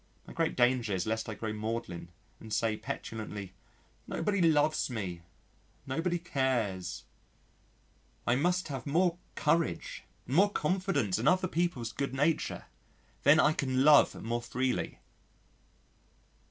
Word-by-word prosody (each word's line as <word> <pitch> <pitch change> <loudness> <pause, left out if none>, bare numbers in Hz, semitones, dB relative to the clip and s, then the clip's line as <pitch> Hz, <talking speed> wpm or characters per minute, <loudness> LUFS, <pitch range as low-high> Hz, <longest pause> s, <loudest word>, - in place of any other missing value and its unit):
My - - -11
great 165 -1 0
danger 120 -4 +2
is 90 - -1
lest 110 0 -2
I 110 - -4
grow 110 -1 -4
maudlin 110 -5 -4 0.3
and 110 - -11
say 110 0 +1
petulantly, 105 -3 -6 0.5
"Nobody 200 -2 0
loves 155 -2 +3
me, 95 -8 -4 0.6
nobody 165 +6 -1
cares." 125 - -1 1.2
I 120 - +3
must 180 +5 +1
have 135 -3 -5
more 175 +4 +2 0.2
courage 155 - 0 0.2
and 130 - -3
more 200 +2 +6
confidence 175 - 0
in 120 - 0
other 185 +2 +4
people's 170 -10 -1
good 140 -1 -3
nature. 150 +4 0 0.6
Then 145 +3 +6
I 150 - +5
can 130 -3 0
love 150 0 +6
more 120 +2 -1
freely. 125 +2 -2
130 Hz, 125 wpm, -31 LUFS, 110-165 Hz, 1.2 s, more